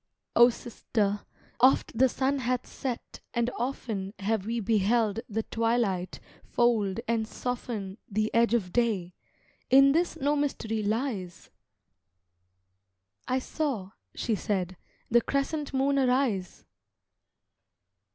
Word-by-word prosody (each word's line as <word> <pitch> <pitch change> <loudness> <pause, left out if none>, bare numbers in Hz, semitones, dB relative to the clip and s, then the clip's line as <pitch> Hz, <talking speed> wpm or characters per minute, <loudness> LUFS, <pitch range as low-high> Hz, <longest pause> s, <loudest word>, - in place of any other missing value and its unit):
"O 240 +1 +8
sister, 215 -4 -2 0.3
oft 255 -1 +4
the 260 +3 +5
sun 270 +3 0
hath 250 0 -1
set 255 -4 -5 0.2
and 235 +1 +1
often 225 -5 -3
Have 205 0 -1
we 235 +1 -1
beheld 220 +1 +2
the 220 +1 -1
twilight 225 -6 0 0.2
fold 225 -4 +1
and 225 -1 0
soften 225 -5 -4
The 215 +1 -1
edge 235 0 +4
of 185 -6 -2
day 210 -7 +1 0.6
In 275 +1 +7
this 340 +4 +1
no 285 +2 +1
mystery 230 -7 -1
lies!" 210 -4 -3 1.8
"I 255 - +1
saw," 260 -8 -2 0.2
she 230 - -1
said, 190 -3 -1 0.4
"the 240 +1 +6
crescent 280 +3 -1
moon 275 +1 +2
arise." 250 -8 0
230 Hz, 110 wpm, -28 LUFS, 205-255 Hz, 1.8 s, O